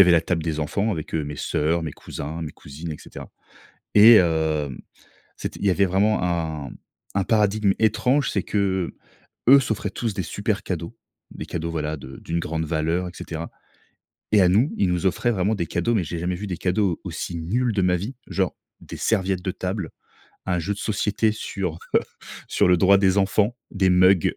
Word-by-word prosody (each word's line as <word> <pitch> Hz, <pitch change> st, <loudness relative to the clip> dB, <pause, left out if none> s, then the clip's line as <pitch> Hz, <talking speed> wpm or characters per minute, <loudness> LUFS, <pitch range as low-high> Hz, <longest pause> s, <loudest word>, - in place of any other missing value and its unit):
y -, -, +12 dB
avait 90 Hz, -, +5 dB
la 85 Hz, -1 st, +6 dB
table 85 Hz, -1 st, -1 dB
des 80 Hz, -1 st, -2 dB
enfants 100 Hz, +8 st, 0 dB
avec, 80 Hz, -2 st, -5 dB
heu, 80 Hz, -2 st, 0 dB
mes 75 Hz, -1 st, -6 dB
sœurs, 80 Hz, +3 st, 0 dB
mes 80 Hz, -3 st, -4 dB
cousins, 80 Hz, +3 st, -6 dB
mes 75 Hz, -, -5 dB
cousines, 75 Hz, +3 st, -8 dB
et -, -, -8 dB
cetera. -, -, -11 dB, 0.7 s
Et, 110 Hz, +3 st, +10 dB
hem, 80 Hz, -, +2 dB, 0.6 s
c'était -, -, -6 dB
il 100 Hz, -, -1 dB
y -, -, +5 dB
avait 100 Hz, +2 st, +3 dB
vraiment 100 Hz, +4 st, +2 dB
un 80 Hz, -6 st, -2 dB, 0.5 s
un 100 Hz, -, +3 dB
paradigme 105 Hz, -2 st, +2 dB
étrange, 125 Hz, +6 st, +2 dB
c'est -, -, 0 dB
qu'eux 95 Hz, -3 st, -1 dB, 0.7 s
s'offraient 110 Hz, -5 st, -2 dB
tous 110 Hz, +1 st, -3 dB
des 95 Hz, -, -2 dB
super 100 Hz, +4 st, -2 dB
cadeaux, 85 Hz, -2 st, -5 dB, 0.4 s
des -, -, -7 dB
cadeaux, 85 Hz, 0 st, -4 dB
voilà, 75 Hz, -1 st, -2 dB
de 65 Hz, 0 st, -10 dB
d'une 85 Hz, +1 st, -3 dB
grande 80 Hz, -1 st, -2 dB
valeur, 80 Hz, +3 st, -1 dB
et 90 Hz, -, -7 dB
cetera. 85 Hz, 0 st, -6 dB, 0.8 s
Et 105 Hz, -, +6 dB
à 90 Hz, -, +5 dB
nous, 110 Hz, -, +3 dB
ils 95 Hz, -, +2 dB
nous 90 Hz, +2 st, 0 dB
offraient 105 Hz, +7 st, +1 dB
vraiment 100 Hz, +1 st, +1 dB
des 85 Hz, -, -2 dB
cadeaux, 100 Hz, +10 st, 0 dB
mais 95 Hz, -6 st, +1 dB
j'ai 85 Hz, +2 st, -5 dB
jamais 90 Hz, +2 st, -1 dB
vu 105 Hz, -, -6 dB
des 90 Hz, -3 st, -3 dB
cadeaux 95 Hz, -1 st, 0 dB
aussi 85 Hz, -, -5 dB
nuls 115 Hz, +9 st, 0 dB
de 100 Hz, -, 0 dB
ma 90 Hz, -1 st, +3 dB
vie, 105 Hz, +10 st, -5 dB
genre 95 Hz, -2 st, -1 dB, 0.3 s
des -, -, -9 dB
serviettes 95 Hz, -4 st, 0 dB
de 95 Hz, -, -1 dB
table, 95 Hz, -1 st, -4 dB, 0.6 s
un 90 Hz, -1 st, 0 dB
jeu 100 Hz, +5 st, -2 dB
de 100 Hz, -, -9 dB
société 110 Hz, 0 st, 0 dB
sur, 95 Hz, -6 st, -4 dB, 0.2 s
heu, -, -, +7 dB, 0.5 s
sur -, -, +3 dB
le 90 Hz, -, +6 dB
droit 100 Hz, +2 st, +6 dB
des 95 Hz, 0 st, +3 dB
enfants, 100 Hz, +4 st, +2 dB, 0.2 s
des 95 Hz, -2 st, +2 dB
mugs, 90 Hz, -1 st, +4 dB
90 Hz, 200 wpm, -23 LUFS, 80-100 Hz, 0.8 s, y